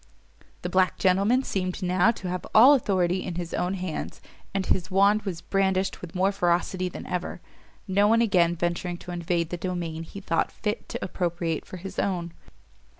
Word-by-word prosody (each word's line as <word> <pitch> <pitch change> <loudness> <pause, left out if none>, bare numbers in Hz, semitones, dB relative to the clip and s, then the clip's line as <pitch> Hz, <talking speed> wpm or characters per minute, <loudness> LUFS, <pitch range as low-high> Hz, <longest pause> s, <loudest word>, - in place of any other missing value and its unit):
The 180 - -2
black 185 0 +2
gentleman 200 +7 +3
seemed 185 -3 -2
now 180 +3 +3
to 220 -5 -2
have 180 0 -3
all 250 +6 +9
authority 185 -8 +1
in 175 - -5
his 175 -1 -5
own 180 +2 0
hands, 180 -4 -5 0.3
and 195 -1 -1
his 180 -1 0
wand 200 +3 +4
was 185 -6 -5
brandished 190 -1 0
with 180 -1 -9
more 190 +2 +3
ferocity 180 -1 0
than - - -8
ever, 180 -1 -3 0.5
no 200 +2 +3
one 225 +2 +4
again 180 -7 +3
venturing 175 +1 -2
to 180 - -9
invade 170 -1 -1
the 175 - -2
domain 170 -3 -3
he 165 +4 -8
thought 165 -4 0
fit 210 +1 -4
to - - -4
appropriate 170 -3 -2
for 185 - -8
his 190 +2 -6
own. 175 -3 -1
185 Hz, 180 wpm, -26 LUFS, 175-195 Hz, 0.5 s, all